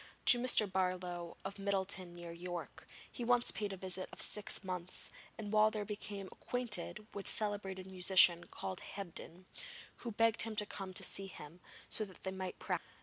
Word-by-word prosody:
To 245 - +11
Mr. 240 -3 +6
Barlow, 180 -2 -2
of 200 +1 -5
Middleton 190 -2 -1
near 175 -1 -8
York, 175 -2 -7 0.2
he 245 - -6
once 245 0 +3
paid 205 -2 -3
a 195 - -5
visit 185 0 -1
of - - -12
six 210 0 +3
months, 185 -1 -3 0.3
and 210 -1 -6
while 215 0 +6
there 215 -1 -3
became 205 -1 -5
acquainted 230 -3 0
with 200 -1 -6
a - - +2
celebrated 200 -3 -1
musician 180 -2 +4
called 95 -1 -6
Hebdin, 185 -2 -9 0.5
who 235 - -6
begged 225 +1 +3
him 225 -1 -1
to 210 - +1
come 195 -2 -6
and 185 - +2
see 195 0 0
him, 165 -2 -11 0.3
so 220 - 0
that 190 -2 -15
they 190 - -2
might 190 -1 -5
practise - - -2
together. - - -24
195 Hz, 185 wpm, -36 LUFS, 180-210 Hz, 0.5 s, To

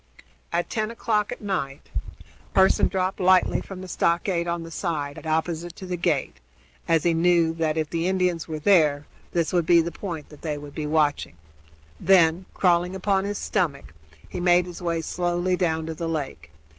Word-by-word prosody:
At 170 +1 0
ten 215 -1 -2
o'clock 215 -2 -1
at - - -6
night 180 -10 -4 0.6
Pearson 190 0 +5
dropped 185 0 -1
lightly 185 0 +4
from 190 -2 -9
the 185 - -8
stockade 170 0 0
on 170 -1 -2
the 165 - -9
side 150 -4 -3
opposite 160 +1 -1
to 190 - -9
the 180 -1 -3
gate, 165 - -1 0.5
as 165 -2 +3
he 170 - +3
knew 165 -1 +3
that, 160 -1 -1
if 155 -1 0
the 165 +1 0
Indians 180 -3 0
were 160 -1 -4
there, 150 -4 +3 0.3
this 170 -1 0
would 175 -3 +1
be 170 -1 +6
the 170 +1 0
point 170 -6 -6
that 150 - -15
they 150 -3 -3
would 145 -1 -10
be 150 -1 -4
watching; 150 - +1 0.6
then, 180 -1 +4
crawling 180 0 +2
upon 190 0 +1
his 205 0 -3
stomach, 155 - -2 0.3
he - - -6
made 175 0 +4
his 180 -1 -9
way 170 -2 -1
slowly 175 +2 0
down 160 -3 0
to 160 - -4
the 165 +1 -4
lake. 145 - -4
170 Hz, 180 wpm, -25 LUFS, 160-185 Hz, 0.6 s, be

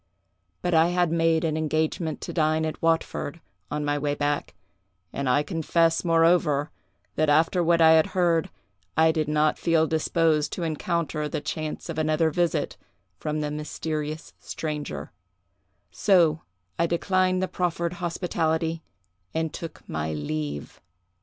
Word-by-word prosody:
But 175 - 0
I 160 +1 +5
had 175 -1 +1
made 165 -1 +2
an 160 -2 0
engagement 155 +1 -1
to - - -5
dine 155 -1 +2
at 155 - -4
Watford, 165 -1 0 0.3
on 150 0 -2
my 145 0 0
way 145 0 -1
back, 145 -9 -2 0.6
and 140 -2 -1
I 145 +4 +3
confess, 165 0 +1
moreover, 165 -3 +3 0.5
that 155 -1 +2
after 165 +4 +3
what 170 0 +3
I 160 0 +8
had 160 -1 +5
heard 170 -3 +2 0.5
I 160 0 +5
did 155 -2 -1
not 150 0 +2
feel 165 -1 +3
disposed 160 -1 +1
to 175 - -3
encounter 155 -1 -2
the - - -2
chance 155 +1 -4
of - - -4
another 155 +1 +2
visit 175 +1 0 0.4
from 150 0 -2
the 150 -1 -2
mysterious 150 +1 -4
stranger; 150 - -5 0.8
so 165 -5 +3 0.4
I 170 - +3
declined 185 +2 +1
the - - 0
proffered 170 -1 -1
hospitality, 165 -2 -1 0.5
and 160 -1 -1
took 165 -3 -8
my 80 0 -3
leave. 75 -1 -4
160 Hz, 140 wpm, -25 LUFS, 150-165 Hz, 0.8 s, I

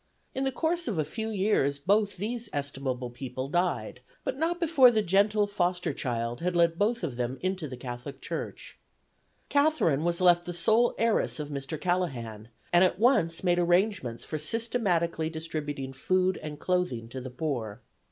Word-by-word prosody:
In 265 - -1
the 265 - +1
course 335 +6 -1
of 205 - -1
a 155 - +1
few 220 +8 -4
years 190 -9 +1
both 200 +7 +1
these 225 +3 -3
estimable 135 -3 -3
people 130 +1 -5
died, 175 +3 -1 0.2
but - - -2
not 330 +5 -1
before 310 -7 +6
the 220 -3 +1
gentle 205 +3 +3
foster 180 -4 -1
child 120 -2 -3
had 180 +1 -1
led 170 -1 +3
both 225 +1 +1
of 135 -8 -3
them 125 +1 -2
into 185 -3 -2
the 130 -2 -7
Catholic 125 +2 -7
Church. - - -6 0.7
Catherine 285 - +2
was 170 0 +1
left 175 -1 +4
the 175 - -4
sole 220 +7 +3
heiress 230 -7 +1
of 150 -1 -4
Mr. 140 +1 -5
Callahan, 130 - -2 0.3
and 175 +1 +7
at 185 - +2
once 210 -8 +2
made 175 -1 +3
arrangements 175 - +1
for 155 - -4
systematically 175 -4 0
distributing 150 -4 -5
food 185 +7 +1
and 150 -1 -6
clothing 180 -12 -1
to 130 +2 -6
the 130 - -6
poor. 125 -5 -4
175 Hz, 170 wpm, -28 LUFS, 140-205 Hz, 0.7 s, and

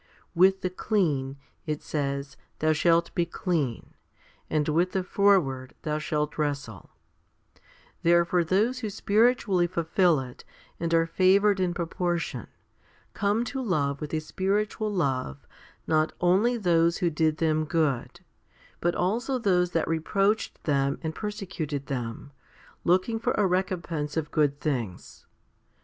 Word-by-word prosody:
With 190 +2 +4
the 185 - -2
clean, 150 -10 0 0.3
it 150 -1 -3
says, 140 -1 -3 0.2
thou 155 0 +2
shall 170 +2 +3
be 175 - +1
clean, 160 - -2 0.6
and 150 -1 0
with 170 +4 +1
the 190 - 0
froward 175 -11 +2
thou 150 -1 -1
shall 150 -1 -1
wrestle* 140 -9 -3 1.1
Therefore 170 +1 +3
those 215 +9 +1
who 220 -4 -3
spiritually 205 -3 +2
fulfil 170 -1 +2
it, 125 -2 -9 0.4
and 165 0 -2
are 165 0 +4
favoured 195 +4 +3
in 180 -2 0
proportion, 175 0 -2 0.7
came 205 +3 +1
to 265 +2 -4
love 145 - -1
with 150 - -5
a - - +1
spiritual 205 +6 -1
love 130 - -2 0.4
not 155 0 +1
only 200 +8 +3
those 170 -4 +2
who 175 -3 0
did 155 0 +1
them 155 -1 +1
good, 155 -5 -1 0.6
but 175 0 0
also 230 +9 0
those 180 -6 +2
that 165 -2 -1
reproached 195 +6 0
them 140 -2 +1
and 160 0 -2
persecuted 180 -9 -4
them, 125 0 -5 0.6
Iooking7or 205 +6 +1
a 210 - +2
recom 185 -1 0
pense 150 -2 -4
of 155 -2 -2
good 145 -2 +1
things. 120 - -4
170 Hz, 130 wpm, -27 LUFS, 150-190 Hz, 1.1 s, With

